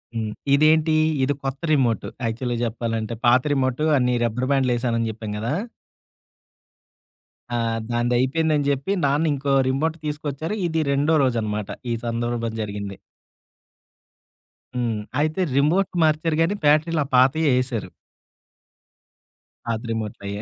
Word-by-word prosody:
హ్మ్. 110 Hz, -1 st, -2 dB, 0.2 s
ఇదేంటి? 155 Hz, +2 st, +4 dB, 0.3 s
ఇది 140 Hz, +2 st, +2 dB
కొత్త 135 Hz, 0 st, -3 dB
రిమోట్ 125 Hz, -6 st, +1 dB, 0.2 s
యాక్చువల్‌గా 120 Hz, +2 st, -2 dB
జెప్పాలంటే, 115 Hz, -1 st, -2 dB
పాత 125 Hz, +2 st, +6 dB
రిమోట్ 130 Hz, +1 st, 0 dB
అన్నీ 125 Hz, -1 st, +2 dB
రబ్బరు 120 Hz, +3 st, -1 dB
బ్యాండులు 130 Hz, -3 st, +2 dB
ఎసానని 115 Hz, -2 st, 0 dB
జెప్పాం 110 Hz, -1 st, -7 dB
గదా! 115 Hz, +6 st, -2 dB, 2.0 s
ఆ! -, -, +1 dB, 0.3 s
దాందైపోందని 130 Hz, +6 st, +1 dB
జెప్పి, 140 Hz, +8 st, 0 dB
నాన్న 145 Hz, +3 st, +2 dB
ఇంకో 140 Hz, 0 st, -1 dB, 0.2 s
రిమోట్ 155 Hz, +5 st, 0 dB
తీసుకొచ్చారు. 150 Hz, +4 st, -3 dB
ఇది 160 Hz, -1 st, 0 dB
రెండో 145 Hz, +3 st, +2 dB
రోజనమాట. 110 Hz, -5 st, -1 dB, 0.2 s
ఈ -, -, +1 dB
సందర్భం 115 Hz, 0 st, -2 dB
జరిగింది. 100 Hz, -1 st, -5 dB, 1.8 s
హ్మ్. 120 Hz, -3 st, -1 dB, 0.2 s
అయితే 155 Hz, +5 st, 0 dB
రిమోట్ 170 Hz, +8 st, +2 dB
మార్చారు 155 Hz, 0 st, +1 dB
గానీ, 170 Hz, +5 st, +2 dB
బ్యాటరీలు 155 Hz, +2 st, +3 dB
ఆ -, -, -10 dB
పాతయే 135 Hz, +5 st, +4 dB
ఏసారు. 120 Hz, -5 st, -4 dB, 1.8 s
పాత 115 Hz, -1 st, -1 dB
రిమోట్లయే. 105 Hz, -2 st, -4 dB
130 Hz, 115 wpm, -23 LUFS, 115-150 Hz, 2.0 s, పాత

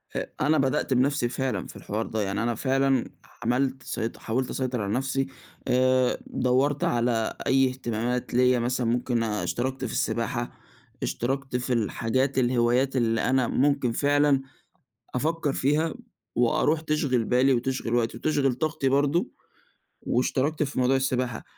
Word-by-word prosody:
أ -, -, -1 dB, 0.2 s
أنا 155 Hz, +1 st, +3 dB
بدأت 135 Hz, 0 st, +1 dB
بنفْسي 130 Hz, 0 st, +2 dB
فعلًا 130 Hz, +1 st, -2 dB
في -, -, -12 dB
الحوار 110 Hz, +2 st, -3 dB
ده، 110 Hz, -1 st, -2 dB
يعني 100 Hz, +2 st, -1 dB
أنا 120 Hz, -1 st, 0 dB
فعلًا 135 Hz, 0 st, +1 dB, 0.3 s
عملت 130 Hz, +2 st, 0 dB
سيط 115 Hz, +1 st, -4 dB
حاولت 125 Hz, +3 st, -2 dB
أسيطر 125 Hz, -3 st, -2 dB
على 100 Hz, +1 st, -2 dB
نفْسي، 135 Hz, +1 st, 0 dB, 0.4 s
آآ 130 Hz, 0 st, +3 dB
دوَّرت 130 Hz, +3 st, +1 dB
على 120 Hz, -2 st, +1 dB
أي 135 Hz, 0 st, +4 dB
اهتمامات 125 Hz, -1 st, -3 dB
ليّا 125 Hz, 0 st, +4 dB
مثلًا 120 Hz, 0 st, -1 dB
ممكن 120 Hz, 0 st, 0 dB
اشتركت 120 Hz, +4 st, -2 dB
في 115 Hz, -, -4 dB
السباحة، 120 Hz, +1 st, -1 dB, 0.5 s
اشتركت 135 Hz, +1 st, -2 dB
في 125 Hz, 0 st, -1 dB
الحاجات 125 Hz, +4 st, 0 dB
الهوايات 125 Hz, +1 st, +2 dB
اللي 115 Hz, -3 st, +1 dB
أنا 130 Hz, -2 st, +2 dB
ممكن 140 Hz, -1 st, +1 dB
فعلًا 145 Hz, +1 st, +3 dB, 0.7 s
أفكَّر 155 Hz, +1 st, 0 dB
فيها 150 Hz, +4 st, +1 dB, 0.4 s
وأروح 135 Hz, +6 st, +2 dB
تشغل 150 Hz, -6 st, 0 dB
بالي 130 Hz, +3 st, +3 dB
وتشغل 125 Hz, -1 st, -1 dB
وقتي 115 Hz, -1 st, 0 dB
وتشغل 140 Hz, -1 st, +1 dB
طاقتي 145 Hz, +1 st, -1 dB
برضو، 145 Hz, +5 st, +1 dB, 0.7 s
واشتركت 135 Hz, +5 st, 0 dB
في 140 Hz, -2 st, -3 dB
موضوع 130 Hz, +1 st, +3 dB
السباحة، 130 Hz, -3 st, -1 dB
130 Hz, 140 wpm, -26 LUFS, 120-135 Hz, 0.7 s, أي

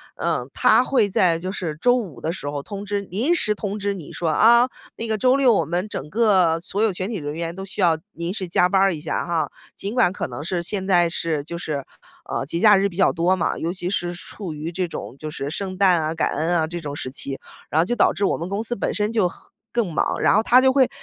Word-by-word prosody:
嗯， -, -, -2 dB
他 -, -, +4 dB
会 245 Hz, -6 st, +2 dB
在 180 Hz, -3 st, +3 dB
就 185 Hz, +3 st, -4 dB
是 165 Hz, -6 st, -4 dB
周 245 Hz, 0 st, +4 dB
五 190 Hz, -, -4 dB
的 160 Hz, -, -1 dB
时 145 Hz, -, -5 dB
候 145 Hz, -1 st, -4 dB
通 200 Hz, 0 st, -7 dB
知 205 Hz, 0 st, -2 dB
临 230 Hz, -, 0 dB
时 215 Hz, -9 st, +4 dB
通 205 Hz, 0 st, -4 dB
知 200 Hz, 0 st, -1 dB
你 175 Hz, -6 st, -9 dB
说 165 Hz, -2 st, -1 dB
啊， 235 Hz, +9 st, +5 dB, 0.3 s
那 230 Hz, -, -5 dB
个 220 Hz, -1 st, 0 dB
周 255 Hz, +3 st, +3 dB
六 260 Hz, -4 st, +4 dB
我 -, -, +1 dB
们 175 Hz, +5 st, -2 dB
整 150 Hz, -4 st, -6 dB
个 185 Hz, -6 st, +3 dB
所 195 Hz, +4 st, -3 dB
有 220 Hz, -2 st, +3 dB
全 185 Hz, +4 st, -4 dB
体 220 Hz, -, -3 dB
人 145 Hz, -2 st, -5 dB
员 170 Hz, +1 st, -4 dB
都 190 Hz, 0 st, -6 dB
需 195 Hz, -, -6 dB
要 165 Hz, -3 st, +4 dB, 0.2 s
临 170 Hz, +3 st, -4 dB
时 190 Hz, -4 st, -3 dB
加 180 Hz, +1 st, +3 dB
班 195 Hz, -2 st, +3 dB
一 -, -, -7 dB
下 -, -, -2 dB
哈。 170 Hz, -1 st, -1 dB, 0.3 s
尽 200 Hz, +3 st, -5 dB
管 225 Hz, -8 st, +4 dB
可 -, -, -3 dB
能 125 Hz, +3 st, -7 dB
是 175 Hz, +1 st, -2 dB
现 190 Hz, +2 st, -2 dB
在 175 Hz, -3 st, +4 dB
是 160 Hz, -3 st, -1 dB
就 170 Hz, +3 st, -6 dB
是， 145 Hz, -5 st, -4 dB, 0.5 s
呃， 135 Hz, -, -2 dB
节 170 Hz, +4 st, -2 dB
假 210 Hz, -1 st, +7 dB
日 200 Hz, +1 st, +2 dB
比 170 Hz, -, -13 dB
较 190 Hz, -, +4 dB
多 180 Hz, +2 st, +2 dB
嘛， 170 Hz, -, -1 dB
尤 165 Hz, +2 st, -2 dB
其 180 Hz, -1 st, -4 dB
是 175 Hz, -3 st, -1 dB
处 175 Hz, -1 st, -7 dB
于 155 Hz, +3 st, -5 dB
这 180 Hz, +1 st, -2 dB
种 135 Hz, -, -7 dB
就 155 Hz, -, -5 dB
是 140 Hz, -1 st, -4 dB
圣 185 Hz, +2 st, -4 dB
诞 185 Hz, -4 st, +4 dB
啊， 155 Hz, +1 st, -1 dB
感 160 Hz, -, 0 dB
恩 170 Hz, +3 st, 0 dB
啊 160 Hz, -1 st, +1 dB
这 175 Hz, +1 st, -5 dB
种 145 Hz, -3 st, -6 dB
时 130 Hz, -, -4 dB
期， 135 Hz, 0 st, -2 dB, 0.3 s
然 155 Hz, -, +1 dB
后 -, -, +1 dB
就 240 Hz, -, -1 dB
导 -, -, +3 dB
致 200 Hz, -, 0 dB
我 -, -, +1 dB
们 170 Hz, -, -5 dB
公 200 Hz, +2 st, -2 dB
司 240 Hz, +1 st, 0 dB
本 -, -, -2 dB
身 210 Hz, +1 st, -1 dB
就 215 Hz, -6 st, +2 dB
很 -, -, -11 dB, 0.3 s
更 225 Hz, -8 st, 0 dB
忙， -, -, 0 dB
然 -, -, +4 dB
后 215 Hz, -, +3 dB
他 250 Hz, +3 st, +6 dB
就 260 Hz, 0 st, +5 dB
会 265 Hz, -2 st, +3 dB
185 Hz, 290 characters per minute, -22 LUFS, 165-210 Hz, 0.5 s, 假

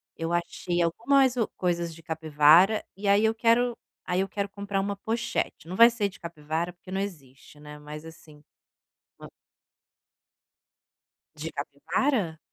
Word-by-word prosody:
Eu 165 Hz, +1 st, -4 dB
achei 175 Hz, 0 st, -1 dB
algumas 255 Hz, +9 st, +3 dB
o 230 Hz, -3 st, +1 dB
coisas 170 Hz, -2 st, -1 dB
de 165 Hz, -, -14 dB
capivara. 160 Hz, +6 st, +4 dB
E 200 Hz, +1 st, -5 dB
aí 200 Hz, +2 st, +4 dB
eu 220 Hz, 0 st, +2 dB
quero 235 Hz, +2 st, +2 dB, 0.3 s
aí 180 Hz, +1 st, 0 dB
eu 195 Hz, -, -1 dB
quero 200 Hz, -1 st, -2 dB
comprar 200 Hz, 0 st, -3 dB
uma 200 Hz, +1 st, -2 dB
pochete. 225 Hz, -5 st, -3 dB
Não 185 Hz, -, -5 dB
vai 230 Hz, +3 st, +8 dB
ser 225 Hz, -4 st, -1 dB
de -, -, -16 dB
capivara, 165 Hz, +1 st, -4 dB
porque 185 Hz, +1 st, -14 dB
não 190 Hz, -, -1 dB
existe, 145 Hz, -7 st, -8 dB
né, 150 Hz, 0 st, -10 dB
mas, 150 Hz, +1 st, -9 dB
assim, 155 Hz, -2 st, -14 dB, 0.8 s
uma -, -, -11 dB, 2.0 s
De 155 Hz, +2 st, -6 dB
capivara? 165 Hz, -, -1 dB
180 Hz, 150 wpm, -27 LUFS, 160-210 Hz, 2.0 s, vai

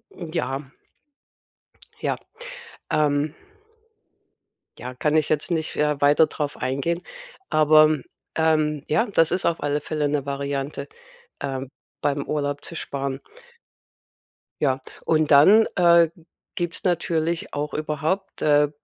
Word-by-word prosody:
Hm, 170 Hz, -3 st, -7 dB
ja. 135 Hz, -3 st, -2 dB, 1.4 s
Ja, -, -, -1 dB, 0.8 s
ähm. 145 Hz, 0 st, +1 dB, 1.5 s
Ja, 125 Hz, +1 st, -6 dB
kann 150 Hz, +4 st, +1 dB
ich 155 Hz, -, +2 dB
jetzt 155 Hz, +2 st, 0 dB
nicht 160 Hz, -2 st, -1 dB
ja 150 Hz, -1 st, +1 dB
weiter 145 Hz, +3 st, +5 dB
drauf 150 Hz, -1 st, -4 dB
eingehen, 140 Hz, +7 st, -1 dB, 0.5 s
aber, 155 Hz, 0 st, +5 dB, 0.4 s
ähm, 155 Hz, -2 st, +1 dB
ja, 220 Hz, +10 st, +2 dB
das 165 Hz, -6 st, +3 dB
ist 185 Hz, -, 0 dB
auf 170 Hz, -, 0 dB
alle 145 Hz, 0 st, 0 dB
Fälle 150 Hz, -1 st, -1 dB
'ne 145 Hz, -1 st, -1 dB
Variante, 140 Hz, 0 st, -3 dB, 0.5 s
ähm, 135 Hz, -1 st, -4 dB, 0.3 s
beim 140 Hz, -1 st, 0 dB
Urlaub 145 Hz, -1 st, -2 dB
zu 170 Hz, -, -7 dB
sparen. 140 Hz, -3 st, -4 dB, 1.4 s
Ja, 135 Hz, -2 st, +2 dB, 0.3 s
und 155 Hz, -1 st, +2 dB
dann, 195 Hz, +11 st, +7 dB
äh, 170 Hz, -2 st, +5 dB, 0.4 s
gibt's 175 Hz, +2 st, -3 dB
natürlich 170 Hz, -2 st, 0 dB
auch 150 Hz, +1 st, -3 dB
überhaupt, 155 Hz, +5 st, -2 dB
äh, 145 Hz, -1 st, +4 dB
150 Hz, 120 wpm, -23 LUFS, 145-160 Hz, 1.5 s, dann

